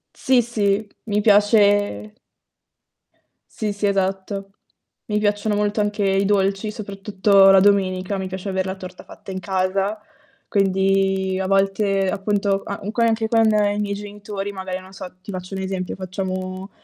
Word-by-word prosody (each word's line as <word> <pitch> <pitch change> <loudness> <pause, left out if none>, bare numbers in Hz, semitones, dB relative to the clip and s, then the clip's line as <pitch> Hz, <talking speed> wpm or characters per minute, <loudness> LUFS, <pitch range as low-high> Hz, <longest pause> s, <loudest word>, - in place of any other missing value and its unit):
Sì, 260 -2 +3
sì, 210 -2 0 0.2
mi 210 -1 0
piace 205 - +3 1.4
Sì, 210 -2 -2
sì, 205 0 -1
esatto. 195 0 -2 0.5
Mi 210 -1 -1
piacciono 205 0 0
molto 210 +1 0
anche 205 0 -1
i 195 0 +2
dolci, 195 +1 +1
soprattutto 200 -1 +3
la 195 0 +7
domenica, 190 -1 +2
mi 190 - -3
piace 190 +1 -6
aver 190 0 -1
la 190 - -3
torta 185 -1 -10
fatta 195 - -11
in 190 - -4
casa. 195 +2 -1 0.5
Quindi 195 -1 +1
a 190 - -2
volte, 195 0 +1
appunto 200 0 0
a 200 -2 -5
co 235 - -1
anche 225 -1 +2
con 225 0 +3
i 205 -1 +2
miei 205 -1 -1
genitori 205 -1 -6
magari 190 -1 -5
non 190 +1 -15
so, 190 -1 -8
ti 200 - -8
faccio 185 +1 -6
un 190 - -3
esempio, 190 -1 -3
facciamo 185 0 -5
195 Hz, 155 wpm, -21 LUFS, 190-205 Hz, 1.4 s, la